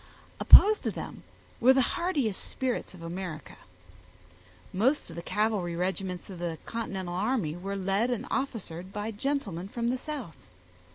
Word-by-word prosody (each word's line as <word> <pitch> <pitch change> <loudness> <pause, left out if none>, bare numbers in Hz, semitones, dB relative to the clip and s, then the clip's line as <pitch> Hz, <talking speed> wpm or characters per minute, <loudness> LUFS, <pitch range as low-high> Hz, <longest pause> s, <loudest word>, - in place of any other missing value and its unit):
Opposed 425 +1 +9
to - - -1
them - - -7 0.4
were 255 +3 +7
the 265 -1 +4
hardiest 325 - 0
spirits 255 -6 -2
of 170 - -11
America. 165 -3 -6 1.2
Most 235 - +1
of - - -9
the 170 - -5
cavalry 205 -3 0
regiments 185 0 -2
of 185 -3 -9
the 170 -2 -3
continental 195 -6 -4
army 195 -4 0
were 195 +3 -4
led 195 +5 +1
and 245 -1 -2
officered 195 -9 -3
by 210 +2 -3
gentlemen 210 - -2
from 235 +3 -2
the 255 +1 -1
South. 275 - -6
200 Hz, 150 wpm, -29 LUFS, 180-250 Hz, 1.2 s, Opposed